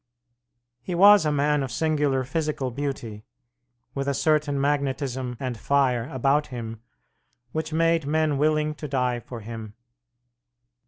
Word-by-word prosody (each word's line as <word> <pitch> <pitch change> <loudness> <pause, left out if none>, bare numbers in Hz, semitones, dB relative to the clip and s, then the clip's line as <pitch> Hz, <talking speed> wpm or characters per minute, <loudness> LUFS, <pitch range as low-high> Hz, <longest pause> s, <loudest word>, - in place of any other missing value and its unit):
He 175 +8 -4
was 200 -1 +7
a - - +2
man 145 0 +2
of 135 -2 -3
singular 145 -3 +1
physical 150 -2 -2
beauty, 120 -5 -5 0.7
with 140 0 -3
a 140 - 0
certain 150 -1 +1
magnetism 135 -3 -1
and 130 -2 -3
fire 130 -3 +1
about 140 +3 +1
him 115 -3 -7 0.7
which 160 +2 -3
made 165 -1 +2
men 155 -2 +1
willing 155 0 +2
to 150 0 -7
die 125 -3 0
for 120 0 -9
him. 110 -1 -8
140 Hz, 130 wpm, -25 LUFS, 125-150 Hz, 0.7 s, was